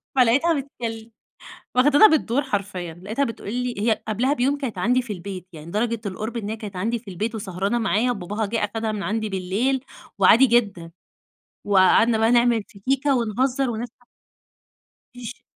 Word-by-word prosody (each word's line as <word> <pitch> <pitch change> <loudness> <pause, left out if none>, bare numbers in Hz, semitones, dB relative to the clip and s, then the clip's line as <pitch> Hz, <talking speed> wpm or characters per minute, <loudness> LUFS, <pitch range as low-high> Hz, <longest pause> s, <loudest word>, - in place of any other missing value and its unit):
فلقيتها 265 +7 +4
بتكل 230 -4 -7 0.6
واخدانا 290 +10 +7
بالدور 285 - +1
حرفيًا. 190 - -4
لقيتها 225 +8 -1
بتقول 230 -2 -6
لي 250 0 -2
هي 220 -1 +1
قبلها 240 +6 +1
بيوم 280 +1 +1
كانت 250 -9 -5
عندي 245 +7 +2
في 230 -4 -6
البيت، 185 0 -8
يعني 160 +2 -10
درجة 230 +1 -1
القُرب 215 +5 -4
إن 210 -2 -4
هي 220 - -4
كانت 205 -3 -8
عندي 225 +6 -1
في 210 -4 -11
البيت، 215 +6 -3
وسهرانة 200 +2 -2
معايا 225 +3 +1
وباباها 205 0 -3
جِه 225 +3 -2
أخدها 220 +1 -3
من 210 -2 -4
عندي 220 0 -2
بالليل 215 +9 -1 0.3
وعادي 225 +7 +7
جدًا. 200 -9 0 0.8
وقعدنا 205 +4 +4
بقى 225 +1 +3
نعمل 240 -2 +3
في 210 - -16
كيكة 270 +3 +1
ونهزّر 250 +3 0
ونضح 235 +2 -4 1.3
فيش 245 0 -9
225 Hz, 160 wpm, -23 LUFS, 200-245 Hz, 1.3 s, واخدانا